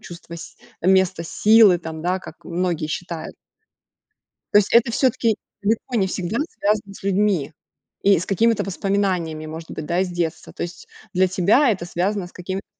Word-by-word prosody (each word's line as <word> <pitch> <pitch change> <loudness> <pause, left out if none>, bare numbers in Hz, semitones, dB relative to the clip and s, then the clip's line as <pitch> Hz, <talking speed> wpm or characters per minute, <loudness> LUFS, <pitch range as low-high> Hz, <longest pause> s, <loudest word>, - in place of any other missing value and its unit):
чувство 170 -1 -10
с - - -10 0.3
место 190 -2 +3
силы, 210 0 +5
там, 160 -1 -7
да, 180 +2 0
как - - -13
многие 175 -3 -1
считают. 165 0 -5 1.2
То 205 - +8
есть, 205 - +1
это 235 0 +5
все-таки 235 -3 +1 0.3
далеко 225 +4 -1
не 195 -3 +2
всегда 190 +5 -3
связано 205 -1 -1
с - - -13
людьми 195 -6 +1 0.5
и 200 -3 +5
с 180 - -4
какими-то 225 +3 +2
воспоминаниями, 185 -5 -1
может 160 +1 -8
быть, 155 - -6
да, 175 +1 0
из 190 - 0
детства, 170 -2 -3
то - - -6
есть, 175 +1 -7 0.2
для 185 0 +3
тебя 205 +9 +3
это 185 -4 -2
связано 185 +2 -1
с - - -16
какими-то. 185 +2 -5
185 Hz, 170 wpm, -22 LUFS, 170-205 Hz, 1.2 s, То